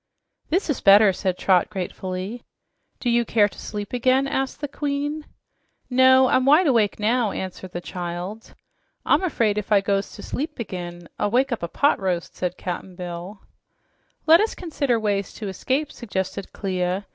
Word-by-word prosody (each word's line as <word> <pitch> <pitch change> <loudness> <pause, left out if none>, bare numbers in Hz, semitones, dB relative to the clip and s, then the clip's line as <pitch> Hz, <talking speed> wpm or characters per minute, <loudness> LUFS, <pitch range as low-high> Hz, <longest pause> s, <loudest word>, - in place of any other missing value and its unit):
"This 365 +5 +1
is 295 - -1
better," 200 0 +7
said 185 -1 -2
Trot 185 -3 +3
gratefully. 190 +2 -5 0.6
"Do - - -4
you 235 0 +3
care 215 -2 +3
to - - -13
sleep 205 +1 -6
again?" 255 +2 +3
asked 270 -1 -2
the 290 - -3
Queen. 290 +2 -3 0.6
"No, 260 +1 +6
I'm 255 - +3
wide 300 +7 +5
awake 230 -9 +2
now," 225 +1 +2
answered 185 -1 -6
the 175 - -5
child. 180 +5 -6 0.5
"I'm - - +4
afraid 230 - +1
if 210 - -8
I 205 - +6
goes 195 0 -1
to - - -10
sleep 300 +1 -4
ag'in, 175 -5 -6
I'll 205 - +1
wake 255 +5 +2
up 240 - -2
a 170 - -2
pot 285 - +2
roast," 180 -3 -2
said 180 0 -3
Cap'n 180 0 -5
Bill. 180 +2 -7 0.8
"Let 325 +3 +7
us 440 - 0
consider 280 -9 -1
ways 200 -2 -1
to 215 - -6
escape," 265 +10 -1
suggested 195 -3 -4
Clia. 185 0 -2
210 Hz, 170 wpm, -23 LUFS, 185-260 Hz, 0.8 s, better